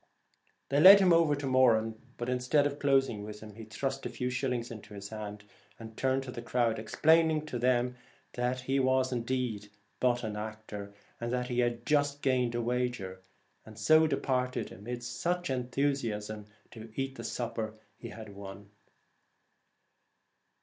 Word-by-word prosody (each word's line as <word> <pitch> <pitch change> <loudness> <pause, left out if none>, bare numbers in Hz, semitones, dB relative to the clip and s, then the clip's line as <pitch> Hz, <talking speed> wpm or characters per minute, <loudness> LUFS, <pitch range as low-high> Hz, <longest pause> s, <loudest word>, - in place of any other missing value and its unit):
' - - -42
They 140 - +2
led 195 +5 +11
him 185 -3 +5
over 165 -3 +4
to 145 0 -5
Moran, 120 -4 +4 0.2
but 120 - -4
instead 125 +4 +2
of 145 0 -2
closing 135 -7 +2
with 105 0 -8
him 110 -1 -10
he 110 +1 -10
thrust 135 +5 -3
a - - -3
few 125 -1 -3
shil 130 +1 -1
lings 120 -1 -3
into 110 -2 -10
his 100 0 -7
hand, 105 -1 -7 0.3
and 110 -1 -10
turning 130 +2 +1
to 130 -1 -7
the 120 - -6
crowd 115 -2 0
explained 160 +6 +3
to 120 - -3
them 125 0 +1 0.7
he 135 +2 +1
was 130 0 +2
indeed 120 -4 -2 0.3
but 120 -1 +2
an 110 -1 -3
actor, 105 -1 -6 0.3
and 120 0 -3
that 125 0 -1
he 125 0 -1
had 120 -1 0
just 145 -1 +1
gained 125 -3 +1
a 120 - 0
wager, 120 -6 -2 0.4
and 110 -1 -13
so 155 +9 +5
departed 130 -3 -1
amid 120 +4 -6 0.2
much 175 -1 0
en 125 -2 -1
thusiasm, 115 -6 -2 0.2
to 110 -1 -10
eat 135 0 -2
the - - -8
supper 115 -2 -3 0.2
he 115 - -9
had 110 -3 -9
won. 100 0 -10
125 Hz, 170 wpm, -31 LUFS, 110-135 Hz, 0.7 s, led